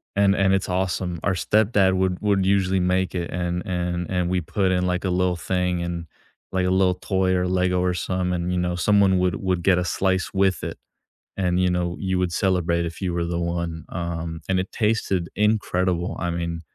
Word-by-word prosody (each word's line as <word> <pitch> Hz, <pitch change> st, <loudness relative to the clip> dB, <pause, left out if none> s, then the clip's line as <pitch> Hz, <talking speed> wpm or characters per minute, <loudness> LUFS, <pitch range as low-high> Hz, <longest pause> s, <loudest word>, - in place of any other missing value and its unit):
And 100 Hz, 0 st, +4 dB
and 95 Hz, 0 st, +3 dB
it's 95 Hz, -, 0 dB
awesome. 90 Hz, -1 st, -1 dB
Our 100 Hz, -, +2 dB
stepdad 100 Hz, +2 st, +2 dB
would 95 Hz, 0 st, 0 dB
would 100 Hz, -2 st, +2 dB
usually 95 Hz, -1 st, +2 dB
make 90 Hz, +1 st, 0 dB
it, 85 Hz, -1 st, -3 dB
and 90 Hz, 0 st, -2 dB
and 90 Hz, -1 st, -2 dB
and 90 Hz, -1 st, 0 dB
we 90 Hz, -1 st, 0 dB
put 95 Hz, +3 st, 0 dB
in, 90 Hz, 0 st, +1 dB
like, 90 Hz, +1 st, -1 dB
a 95 Hz, -, +1 dB
little 90 Hz, 0 st, +1 dB
thing 90 Hz, 0 st, -1 dB
and, 85 Hz, -1 st, -4 dB, 0.5 s
like, 95 Hz, -1 st, 0 dB
a -, -, +2 dB
little 95 Hz, 0 st, +3 dB
toy 95 Hz, -1 st, 0 dB
or 90 Hz, 0 st, +1 dB
Lego 90 Hz, 0 st, +1 dB
or 90 Hz, -1 st, +1 dB
some 90 Hz, 0 st, -1 dB
and, 90 Hz, 0 st, -1 dB
you 90 Hz, -, 0 dB
know, 90 Hz, 0 st, -1 dB
someone 100 Hz, 0 st, +3 dB
would 90 Hz, -1 st, +1 dB
would 90 Hz, -2 st, -1 dB
get 95 Hz, -2 st, +4 dB
a 90 Hz, -, -1 dB
slice 95 Hz, 0 st, 0 dB
with 95 Hz, -1 st, +1 dB
it. -, -, -4 dB, 0.6 s
And, 90 Hz, -2 st, +1 dB
you 90 Hz, -, +3 dB
know, 90 Hz, -1 st, -1 dB
you 95 Hz, -2 st, 0 dB
would 90 Hz, -2 st, 0 dB
celebrate 85 Hz, -3 st, +1 dB
if 85 Hz, 0 st, -7 dB
you 90 Hz, -, -1 dB
were 85 Hz, 0 st, -1 dB
the 85 Hz, 0 st, -2 dB
one, 85 Hz, -1 st, -3 dB
um, 85 Hz, -2 st, -4 dB
and 95 Hz, -1 st, +2 dB
it 95 Hz, -, -4 dB
tasted 105 Hz, -5 st, 0 dB
incredible. 95 Hz, -4 st, 0 dB
I 85 Hz, -, -1 dB
mean, 85 Hz, -1 st, -3 dB
90 Hz, 210 wpm, -23 LUFS, 85-95 Hz, 0.6 s, And